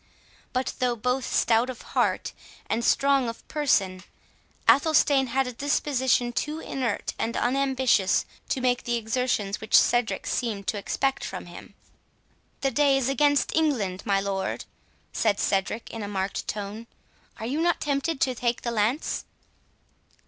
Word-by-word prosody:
But, 255 0 -1
though 250 -2 +1
both 250 +3 -1
stout 235 +2 +3
of 255 - -7
heart, - - +1 0.3
and 235 - -1
strong 275 -1 +3
of 230 - -9
person, 200 -12 +1 0.7
Athelstane 285 -2 +4
had 265 +3 +1
a 250 - -5
disposition 260 -2 +1
too 300 +5 -2
inert 255 -8 -3
and 230 - -1
unambitious 260 -6 +2 0.2
to 265 - -1
make 250 -1 +1
the 240 - -1
exertions 225 -3 -1
which 220 - +4
Cedric 240 -1 +2
seemed 215 -5 -2
to 210 - -1
expect 270 +6 -1
from - - -5
him. - - -12 0.9
"The 270 - +1
day 280 +1 +3
is 270 -1 0
against 285 +1 +2
England, 220 -12 0
my 200 -2 +2
lord," 195 -1 -3 0.5
said 210 -3 +1
Cedric, 195 +3 -1
in 225 - -6
a 205 - -4
marked 195 -1 -3
tone; 210 +2 -5 0.5
"are 220 - -4
you 280 +7 -1
not 345 0 +2
tempted 285 +1 -1
to 260 - +2
take 240 0 -1
the 235 - -1
lance?" 230 +7 0
245 Hz, 150 wpm, -26 LUFS, 220-270 Hz, 0.9 s, Athelstane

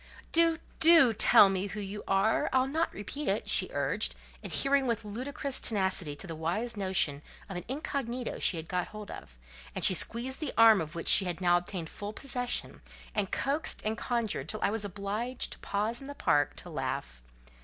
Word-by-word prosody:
"Do—do 330 -4 +4
tell 205 -1 +7
me 195 0 -1
who 210 - -6
you 205 +1 -6
are? 195 +3 +2
I'll 260 0 +3
not 315 +5 -1
repeat 280 +9 -6
it," - - 0
she - - +2
urged, - - 0 0.3
adhering 275 -1 +1
with 230 -2 -1
ludicrous 260 +5 -2
tenacity 190 -7 0
to 170 - -7
the 165 - -6
wise 175 +10 -2
notion 185 -8 +1 0.3
of 195 - -7
an 175 - -5
incognito 255 -2 -3
she 175 - +2
had 160 0 -6
got 180 -1 -2
hold 210 -1 -9
of; - - -11 0.4
and - - +1
she - - +6
squeezed 240 +8 -1
the 305 -4 -4
arm 225 -3 +7
of 155 +1 -6
which 165 - -5
she 195 - +6
had 175 -2 -3
now 175 -1 +3
obtained 175 -1 -3
full 205 +1 -6
possession, 245 0 -3 0.3
and 200 -3 0
coaxed 285 +3 0
and 215 +1 0
conjured 225 - -2
till 215 - -4
I 200 - +2
was 220 -1 -2
obliged 205 +5 -3
to - - -8
pause 215 +4 -2
in 270 - -9
the 285 - -7
park 145 - +1
to - - -9
laugh. - - -4
210 Hz, 190 wpm, -30 LUFS, 190-255 Hz, 0.4 s, tell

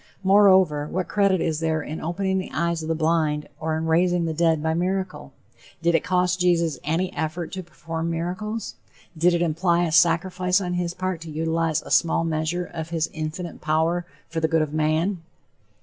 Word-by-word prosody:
Moreover, 190 -6 +5
what 180 +2 -2
credit 195 -2 +2
is 155 -2 -1
there 160 -1 0
in 155 - -6
opening 190 +3 -1
the 185 - -5
eyes 170 0 0
of 155 - -6
the 165 - +1
blind 155 -2 +1
or 160 0 -1
in 160 - -2
raising 175 +1 +2
the 160 - -1
dead 160 -1 +2
by 160 0 +1
miracle? 185 +2 -2 0.5
Did 170 0 +3
it 165 - +2
cost 180 -1 +1
Jesus 170 -4 +2
any 175 +5 -1
effort 160 +3 -3
to 190 - -4
perform 165 -1 -5
miracles? 180 +7 -3 0.4
Did 175 +2 +3
it 170 - +1
imply 170 +1 +1
a 165 - -1
sacrifice 180 +3 +3
on 180 -2 -3
his 175 -1 -2
part 185 -2 -3
to 165 - -8
utilize 160 0 0
a - - -10
small 165 0 +3
measure 165 +2 -1
of 160 -2 -6
his 165 -1 -1
infinite 160 +2 -5
power 160 +3 +1 0.2
for 165 0 -3
the 160 - +2
good 160 -1 +2
of 150 -1 -5
man? 160 +4 0
170 Hz, 190 wpm, -24 LUFS, 160-180 Hz, 0.5 s, Moreover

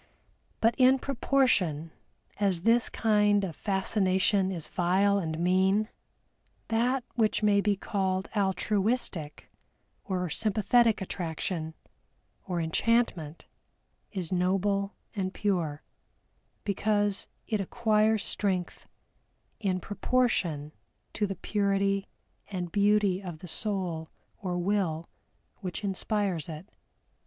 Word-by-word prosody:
But 230 +1 +4
in 260 +1 +6
proportion 235 - +1 0.5
as 190 -4 +1
this 230 +2 +3
kind 210 -2 +3
of 175 -5 -3
fascination 190 -1 +1
is 165 -5 -3
vile 195 +3 +2
and 160 -4 -3
mean, 190 +5 +2 0.8
that 245 +3 +1
which 220 -2 +1
may 205 -1 +4
be 205 0 +2
called 190 -1 -1
altruistic 195 -4 -1 0.5
or 180 -2 -2
sympathetic 220 +5 +2
attraction, 165 -2 -3 0.7
or 180 -2 -1
Enchantment, 170 -2 0 0.7
is 185 -5 -4
noble 195 +2 +1 0.2
and 190 -2 -2
pure, 170 -8 -1 0.8
because 205 0 0 0.2
it 215 -3 -1
acquires 215 0 +2
strength 185 -4 -2 0.7
in 190 -3 0
proportion 190 - 0 0.4
to 210 - 0
the 195 - -4
purity 200 0 0 0.4
and 180 -4 -4
beauty 205 -1 +3
of 175 -4 -7
the 180 - -10
soul 175 -4 -2 0.3
or 180 -5 -2
will 175 -3 0 0.5
which 185 +2 -5
inspires 195 -4 -1
it. 155 +2 -7
195 Hz, 100 wpm, -29 LUFS, 180-210 Hz, 0.8 s, in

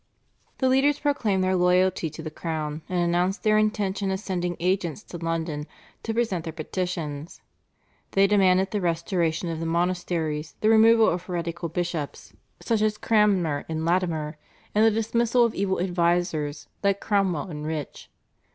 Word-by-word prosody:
The 260 - +1
leaders 270 +3 +3
proclaimed 225 -11 0
their 185 0 +2
loyalty 180 -1 +2
to 160 +2 -9
the 155 - -5
crown, 155 -1 -4
and 180 - -1
announced 175 +3 +1
their 215 -1 +4
intention 205 -2 0
of 190 0 -1
sending 180 -3 -3
agents 180 0 -1
to 175 - -9
London 160 -2 -3 0.3
to 225 - -3
present 225 -7 -1
their 160 - -6
petitions. 165 -2 -4 0.7
They 195 0 +5
demanded 190 -2 +3
the 210 - -1
restoration 170 0 0
of 165 -1 -3
the 165 - -3
monasteries, 170 -3 -1
the 215 - +3
removal 225 0 +6
of 175 - 0
heretical 170 -1 -4
bishops 170 -3 -4 0.3
such 225 -3 +1
as 215 0 +1
Cranmer 195 -11 +2
and 160 0 -2
Latimer, 165 -3 0 0.4
and 215 - +4
the 225 - +7
dismissal 235 +2 +2
of 230 - -1
evil 190 -1 -1
advisers 175 -4 0
like 200 -1 +1
Cromwell 190 -6 0
and 150 0 -5
Rich. 155 -2 -5
180 Hz, 155 wpm, -25 LUFS, 165-205 Hz, 0.7 s, the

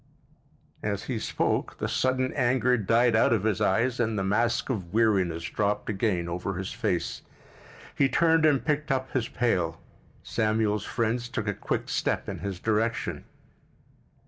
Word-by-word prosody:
As 100 -2 -2
he 125 -4 -3
spoke - - -1
the - - -2
sudden 130 0 0
anger 125 0 +2
died 115 +2 +3
out 110 - +4
of 110 -4 +2
his 110 -1 0
eyes 120 +4 +2
and 115 -2 0
the 95 - 0
mask 115 +6 +1
of 95 -8 -4
weariness 95 -7 +2
dropped 105 +4 -1
again 95 -4 0
over 90 +3 -3
his 95 +1 -4
face. - - -2 0.7
He 135 - +3
turned 165 +3 +3
and 145 -4 +3
picked 150 0 0
up 130 0 -1
his 120 -3 0
pail. 90 -9 0 0.4
Samuel's 110 -1 0
friends 120 +1 -1
took 110 -3 -3
a 100 - +1
quick - - -3
step - - -1
in - - -5
his 95 +1 -4
direction. 110 +2 -1
110 Hz, 155 wpm, -27 LUFS, 100-125 Hz, 0.7 s, out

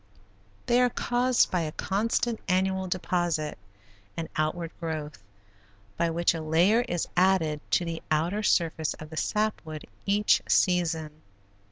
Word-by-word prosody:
They 245 0 +3
are 250 - +4
caused 245 +1 +1
by 180 - +1
a 155 -2 -3
constant 225 +6 -1
annual 190 0 +1
deposit 175 - -1 0.6
and 165 -1 -4
outward 165 +2 -1
growth, 155 - -5 0.7
by 170 - +1
which 170 +1 +2
a 165 - -4
layer 170 +9 +3
is 175 -9 -2
added 175 -5 +2
to 175 - +2
the 165 -1 -4
outer 170 +7 +1
surface 165 -6 +1
of 155 0 -11
the 160 - -8
sap 215 +4 0
wood 155 -2 -8 0.2
each 205 +1 +3
season. 160 -4 +1
175 Hz, 140 wpm, -27 LUFS, 160-195 Hz, 0.7 s, are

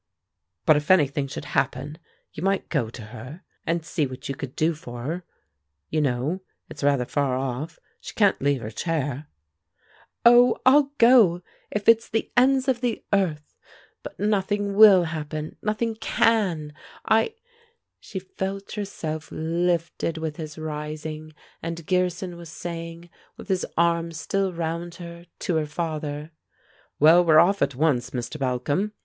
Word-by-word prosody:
"But 155 - +6
if 150 0 -4
anything 145 -6 +3
should 135 - -7
happen, 135 +3 -2 0.3
you 150 - -7
might 195 +1 0
go 130 -9 0
to 115 - -10
her, 125 - -10 0.2
and 165 0 0
see 150 -3 -1
what 130 0 -8
you 140 - -2
could 135 -1 -7
do 160 +2 +2
for 120 -6 -9
her. 165 +7 -3 0.7
You 155 - +1
know? 140 +7 -1 0.3
It's 145 - -9
rather 140 -3 +2
far 135 -1 0
off; 135 +5 -4 0.2
she - - -10
can't 205 -3 +3
leave 140 -2 +1
her 110 -1 -6
chair 145 +1 -2 0.5
" - - -33
"Oh, 240 +1 +7
I'll 280 +2 +5
go, 225 -8 +6 0.3
if 210 -1 -3
it's 230 0 +5
the 225 - -2
ends 260 +1 +4
of 250 -2 +1
the 245 -3 -1
earth! 165 -7 0 0.5
But - - -10
nothing 205 0 0
will 200 -3 +8
happen! 155 -1 -5
Nothing 215 +2 -1
can! 205 -8 +1 0.3
I 225 - +2 0.3
" - - -37 0.3
She - - -8
felt 190 +1 -5
herself 160 -7 -5
lifted 165 0 -1
with 160 -2 -4
his 155 -2 -7
rising, 155 0 -5 0.3
and 165 -1 -5
Gearson 180 0 -1
was 170 -1 -10
saying, 165 +1 -7 0.3
with - - -11
his 185 -1 0
arm 170 0 +2
still 195 +4 -1
round 170 0 -4
her, 170 0 -10
to 170 - 0
her 155 -1 -1
father: 150 -1 -4 0.7
"Well, 165 +4 +7
we're 160 -2 +5
off 195 +5 +5
at 140 -1 +1
once, 130 -4 +1
Mr. 125 +4 -5
Balcom. 135 +10 -1
165 Hz, 155 wpm, -25 LUFS, 150-190 Hz, 0.7 s, will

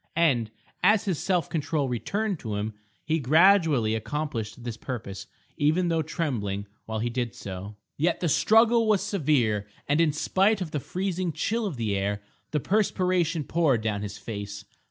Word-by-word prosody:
And, 130 -10 +3 0.3
as 210 +2 +4
his 185 -6 -1
self 180 -3 +1
control 150 -2 -1
returned 195 - -2
to 110 -3 -4
him, 105 +2 -2 0.3
he 160 +1 +1
gradually 155 - +4
accomplished 110 -1 -3
this 120 -2 -4
purpose, 100 -6 -6 0.3
even 165 +4 +2
though 165 -1 +2
trembling 120 - -2 0.2
while 110 0 -3
he 115 +2 -1
did 120 -1 -2
so. 100 +2 -7 0.2
Yet 165 +4 +1
the 175 - 0
struggle 225 +7 +4
was 205 -3 +3
severe, 135 - +1 0.2
and 145 +3 +3
in 160 -2 +4
spite 195 +7 +2
of 175 -5 -4
the 150 - -1
freezing 185 +2 -2
chill 225 +7 -1
of 160 -9 -5
the 110 -4 -1
air, 100 +1 -1 0.3
the 150 - 0
perspiration 180 -4 +1
poured 145 -7 +2
down 105 -2 -1
his 105 -1 -5
face. 100 -2 -6
150 Hz, 165 wpm, -27 LUFS, 110-180 Hz, 0.3 s, as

